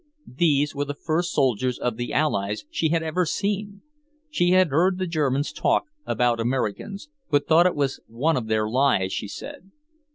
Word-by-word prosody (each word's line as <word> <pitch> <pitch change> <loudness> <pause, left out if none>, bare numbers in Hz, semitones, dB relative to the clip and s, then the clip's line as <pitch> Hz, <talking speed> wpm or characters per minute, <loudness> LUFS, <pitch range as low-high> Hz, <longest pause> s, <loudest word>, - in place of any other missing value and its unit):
These 145 -2 +2
were 145 0 -2
the 145 0 -5
first 170 +4 -1
soldiers 130 -2 +1
of 125 -2 -2
the 120 +1 -4
Allies 105 -8 0
she 160 - 0
had 165 0 +1
ever 160 +3 0
seen. 200 +3 -3 0.5
She 175 -12 +2
had 185 -1 +4
heard 180 +6 +2
the 185 - -1
Germans 145 -4 0
talk - - +1 0.2
about 120 -1 +1
Americans, 130 - -2 0.2
but 145 -3 +1
thought 170 +3 +6
it 180 - -1
was 140 -2 -1
one 140 +9 0
of 120 -3 -2
their 110 -1 +1
lies, 120 -6 +2
she - - -3
said. 185 - -9
145 Hz, 175 wpm, -24 LUFS, 125-175 Hz, 0.5 s, thought